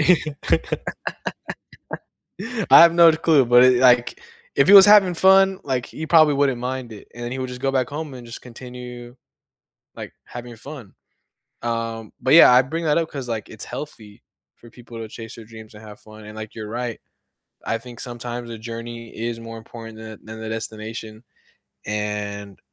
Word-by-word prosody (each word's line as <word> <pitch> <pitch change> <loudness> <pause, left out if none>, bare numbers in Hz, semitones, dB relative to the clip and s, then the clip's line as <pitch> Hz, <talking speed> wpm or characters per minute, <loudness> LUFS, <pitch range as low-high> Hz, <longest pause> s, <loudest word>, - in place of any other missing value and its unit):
I 155 -3 0 1.9
have 170 0 +9
no 170 -1 +7
clue, 155 -3 +3
but, 120 +1 +6
it 130 -1 +5
like, 125 -2 +3 0.3
if 140 - +3
he 200 - +8
was 195 0 +10
having 205 -4 +6
fun, 190 +2 +4
like, 130 -4 -2
he 160 - -7
probably 155 -3 +5
wouldn't 135 -3 +1
mind 125 -1 -5
it, 105 - -13
and 120 0 -7
then 120 - -5
he 130 - -5
would 130 0 -4
just 125 0 -8
go 135 0 -1
back 130 -2 0
home, 150 -1 -6
and 120 -2 -11
just 115 - -9
continue, 125 0 -10 0.8
like, - - -9
having 120 -1 -9
fun, 125 -3 -11 0.7
um, 115 -1 -4
but, 130 - +2
yeah, 165 -6 +9
I 125 - +7
bring 165 +6 -5
that 150 +1 +2
up 165 -1 -1
'cause, 135 -3 -7
like, 110 -3 -4
it's 110 - -9
healthy 115 -6 -9 0.3
for 120 - -17
people 120 -1 -13
to 110 - -6
chase 115 +1 -10
their 115 - -12
dreams 110 -1 -13
and 105 +1 -14
have 105 -1 -12
fun, 110 0 -14
and, 105 0 -11
like, 110 0 -8
you're 110 -2 -7
right, 120 0 -4 0.7
I 115 - -1
think 120 +1 -13
sometimes 120 0 -7
the 115 - -7
journey 115 +1 -8
is 115 +1 -4
more 115 0 -9
important 115 0 -11
than 110 -1 -10
than 110 0 -9
the 110 - -6
destination, 110 0 -7 0.6
and 105 -1 -4
120 Hz, 180 wpm, -22 LUFS, 110-135 Hz, 1.9 s, was